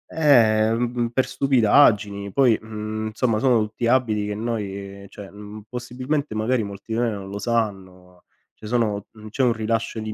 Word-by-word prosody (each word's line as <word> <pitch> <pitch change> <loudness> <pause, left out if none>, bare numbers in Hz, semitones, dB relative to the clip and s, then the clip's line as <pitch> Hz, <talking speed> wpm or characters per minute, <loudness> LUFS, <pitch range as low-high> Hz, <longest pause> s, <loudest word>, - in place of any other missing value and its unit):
ehm, 115 -7 +4
mh 120 0 0
mhmm, 120 - +1
per 130 +2 0
stupidaggini, 105 -6 +3
poi, 125 0 +4
mhmm, 110 0 -5
insomma, 110 0 0
sono 120 -2 +3
tutti 110 +2 -3
abiti 115 -4 +1
che 105 - -3
noi, 100 -3 -5
cioè, 100 -2 -11
mhmm, 105 +1 -10
possibilmente 125 +3 -3
magari 115 +3 0
molti 100 +2 -7
di 115 - 0
noi 120 -1 +1
non 100 -3 -6
lo 100 +1 -6
sanno, 95 -6 -4 0.3
cioè 110 - -11
sono 105 -3 -1
mhmm, 110 -1 -12
c'è 115 - -3
un 125 -2 +3
rilascio 115 0 -2
di 110 0 -5
110 Hz, 180 wpm, -23 LUFS, 105-120 Hz, 0.3 s, ehm